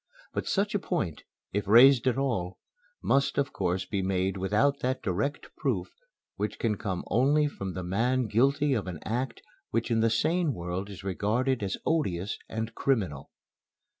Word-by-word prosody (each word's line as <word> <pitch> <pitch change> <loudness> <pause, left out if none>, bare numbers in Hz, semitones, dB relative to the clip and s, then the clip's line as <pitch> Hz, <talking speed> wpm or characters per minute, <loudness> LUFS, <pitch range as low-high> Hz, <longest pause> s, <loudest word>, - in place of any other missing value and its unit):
But - - -3
such 205 +1 +1
a 205 - +1
point, 160 - -2 0.3
if 100 0 -1
raised 125 +4 +7
at 130 - +2
all, 110 -10 -1 0.5
must 140 0 +2
of 140 -1 0
course 95 0 -1
be 100 -2 -2
made 95 0 0
without 105 +9 +1
that 130 +1 -1
direct 110 +10 -2
proof - - -1 0.5
which - - -2
can 110 -2 0
come 95 -3 -3
only 140 +8 +4
from 95 -10 -5
the 90 - -4
man 120 +8 +1
guilty 135 +6 +2
of 110 -6 -1
an 90 -3 -4
act 120 +2 -3 0.3
which 115 +2 -1
in 115 - +3
the 115 +1 +3
sane 160 +5 +1
world 90 +3 -4
is 100 -2 -9
regarded 110 +7 0
as 95 -2 -2
odious 105 - 0
and 110 +1 -3
criminal. 95 - -1
110 Hz, 165 wpm, -28 LUFS, 95-135 Hz, 0.5 s, raised